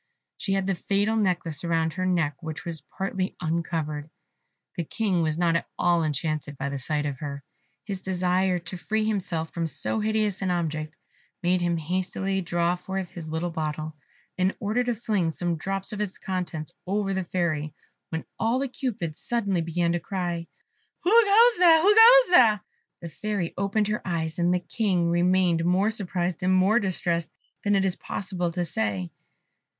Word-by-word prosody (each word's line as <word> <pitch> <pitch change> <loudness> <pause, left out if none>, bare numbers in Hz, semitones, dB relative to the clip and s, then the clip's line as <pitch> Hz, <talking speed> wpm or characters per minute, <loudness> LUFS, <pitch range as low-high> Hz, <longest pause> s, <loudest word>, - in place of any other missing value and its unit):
She 195 - -2
had 195 -1 +1
the 195 - +1
fatal 200 +4 0
necklace 180 -7 0
round 165 -1 +1
her 185 +2 -1
neck, 160 -6 +1
which 160 -2 -6
was 165 -4 -5
partly 190 +4 -3
uncovered. 160 -3 -2 0.7
The 170 - -2
King 190 +1 0
was 155 -1 0
not 170 -1 +2
at 170 - 0
all 175 -1 +3
enchanted 150 -1 -2
by 140 +1 -2
the 140 0 -4
sight 150 +3 -1
of 140 -3 -3
her. 140 -1 -5 0.4
His 195 -3 -4
desire 185 0 +1
to 175 +1 -7
free 220 +4 -1
himself 175 -6 -2
from 165 -1 -1
so 190 - -1
hideous 215 -2 0
an 190 - 0
object 155 -3 -2 0.5
made 180 +1 +2
him 175 -1 +1
hastily 185 +3 -1
draw 175 0 +1
forth 185 0 -5
his 170 -4 -8
little 160 +2 -2
bottle, 155 -1 -3 0.4
in 185 +1 +2
order 215 +4 0
to 240 -1 0
fling 210 -6 0
some 170 +1 -1
drops 195 +5 -3
of 210 - -3
its 200 -3 -3
contents 175 -5 -4 0.2
over 195 0 0
the 190 0 -1
Fairy, 160 -4 -2 0.3
when 160 -1 -4
all 230 +3 +2
the 275 +1 -1
Cupids 215 - -4
suddenly 200 -7 0
began 170 +1 0
to 175 - 0
cry, 175 -1 -3 0.6
"Who 360 - +2
goes 460 +1 +6
there? 335 -3 +7
who 395 +6 +5
goes 480 +2 +8
there?" 220 - +6 0.4
The 170 - -6
Fairy 200 +1 -3
opened 200 +2 0
her 210 - -1
eyes, 165 -2 -2
and 175 +1 +3
the 180 0 +1
King 180 -4 0
remained 175 -1 +3
more 185 +5 +2
surprised 180 -5 -2
and 185 +1 +2
more 195 +5 +4
distressed 175 -4 -1 0.3
than 205 -1 +2
it 195 0 +2
is 190 -1 0
possible 180 -3 -3
to 175 +1 -2
say. 105 - -2
180 Hz, 175 wpm, -26 LUFS, 165-200 Hz, 0.7 s, goes